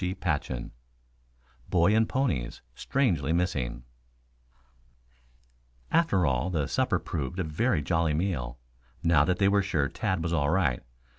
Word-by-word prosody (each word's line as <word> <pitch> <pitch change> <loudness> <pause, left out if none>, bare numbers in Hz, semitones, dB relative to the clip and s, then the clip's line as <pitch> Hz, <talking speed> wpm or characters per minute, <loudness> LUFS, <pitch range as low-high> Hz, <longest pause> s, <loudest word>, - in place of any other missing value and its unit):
CHAPTER 90 -7 -1
VII - - -7 1.0
BOY 90 +4 +4
AND 110 0 +3
PONIES 85 - -1
STRANGELY 85 - 0
MISSING 75 -9 -1 2.1
After 160 - +3
all, 65 +4 +1
the 80 -6 0
supper - - +1
proved 75 +1 -4
a 95 - 0
very 80 - 0
jolly 80 -1 +1
meal, 75 -8 -2 0.5
now 85 -4 +5
that 90 +1 +1
they 100 - +3
were 100 0 +4
sure 85 -8 0
Tad 95 -3 -2
was 85 0 -1
all 70 -3 +1
right. 80 -8 +1
85 Hz, 135 wpm, -28 LUFS, 70-95 Hz, 2.1 s, now